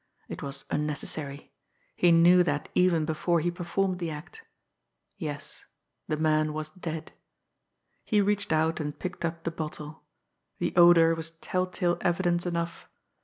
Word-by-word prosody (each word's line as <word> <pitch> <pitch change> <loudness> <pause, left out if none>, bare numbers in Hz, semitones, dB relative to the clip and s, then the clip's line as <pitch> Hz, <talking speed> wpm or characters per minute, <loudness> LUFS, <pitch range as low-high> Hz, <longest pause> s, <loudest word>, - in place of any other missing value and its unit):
It - - -7
was 140 0 -5
unnecessary 150 -1 -3 0.4
he 175 - +4
knew 175 +2 +7
that 145 -4 -1
even 175 -4 +3
before 165 +2 +1
he 175 +2 0
performed 180 +2 -1
the 170 -2 -2
act. 160 - -9 0.7
Yes 150 -6 -5 0.4
the 155 - -1
man 155 0 +2
was 155 0 -5
dead 165 -4 -6 0.9
He 210 - +2
reached 205 -1 +1
out 160 +1 +2
and 150 -1 -4
picked 180 -2 -5
up 165 0 -3
the 165 - -2
bottle. 155 -1 -6 0.6
The - - -1
odour 170 -1 +7
was 165 0 -4
tell 180 +3 -2
tale 175 -1 0
evidence 175 0 +1
enough. 170 -1 -3
165 Hz, 145 wpm, -28 LUFS, 155-175 Hz, 0.9 s, knew